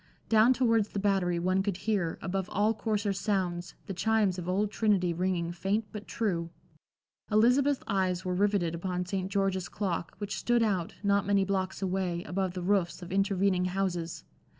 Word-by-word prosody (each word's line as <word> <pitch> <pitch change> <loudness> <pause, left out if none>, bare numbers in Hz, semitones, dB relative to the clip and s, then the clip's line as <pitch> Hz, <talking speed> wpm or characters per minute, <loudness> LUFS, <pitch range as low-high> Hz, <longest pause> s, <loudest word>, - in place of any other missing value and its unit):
Down 225 +2 +6
towards 230 -5 +2
the 200 - -3
Battery 190 -3 +1
one 185 +2 +1
could 195 -2 -2
hear, 200 -6 -1
above 190 0 -2
all 210 +3 +2
coarser 210 -2 -1
sounds, 185 -4 -2
the 195 - -5
chimes 200 -1 +1
of 180 0 -5
Old 200 +3 +1
Trinity 195 -6 +2
ringing 175 -1 -1
faint 195 +5 -1
but 210 -1 -8
true. 175 -7 -1 0.8
Elizabeth's 250 +6 +3
eyes 185 -3 0
were 180 - 0
riveted 195 -3 +1
upon 180 +1 -2
St. 190 0 -3
George's 195 -2 0
clock, 175 -5 -3
which 205 -1 -4
stood 240 -1 +2
out, 190 -6 -1
not 200 -1 +2
many 200 -1 +3
blocks 190 0 -2
away, 180 -2 -1
above 190 -2 -2
the 180 - -4
roofs 185 -2 0
of 175 - -9
intervening 195 -1 +2
houses. 180 -3 -2
195 Hz, 170 wpm, -29 LUFS, 180-205 Hz, 0.8 s, Down